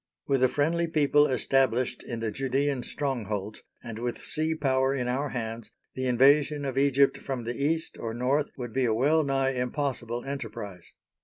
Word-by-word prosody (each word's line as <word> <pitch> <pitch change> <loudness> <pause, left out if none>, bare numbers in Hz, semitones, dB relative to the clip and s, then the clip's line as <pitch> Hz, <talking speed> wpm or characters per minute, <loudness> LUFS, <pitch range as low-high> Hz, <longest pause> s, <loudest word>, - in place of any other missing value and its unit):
With 135 -2 +1
a 130 - +5
friendly 170 +4 +1
people 150 -2 +4
established 130 -1 +1
in 115 -2 -6
the 110 -1 -1
Judæan 135 +2 0
strongholds, 110 -9 -3 0.2
and 115 -2 -7
with 120 0 -4
sea 160 +1 -1
power 135 -2 +1
in 125 -2 -2
our 135 +4 -1
hands, 115 -2 -5 0.2
the 130 0 -2
invasion 140 +4 +4
of 135 -2 -3
Egypt 140 0 +3
from 130 -3 -4
the 120 +1 -4
East 160 +2 -1
or 115 -1 -4
North 135 +5 +1
would 120 -3 -6
be 130 -1 +1
a 110 -2 +2
well 150 +7 +3
nigh 135 -1 +1
impossible 125 -2 -2
enterprise. 110 -9 -6
130 Hz, 170 wpm, -27 LUFS, 120-140 Hz, 0.2 s, a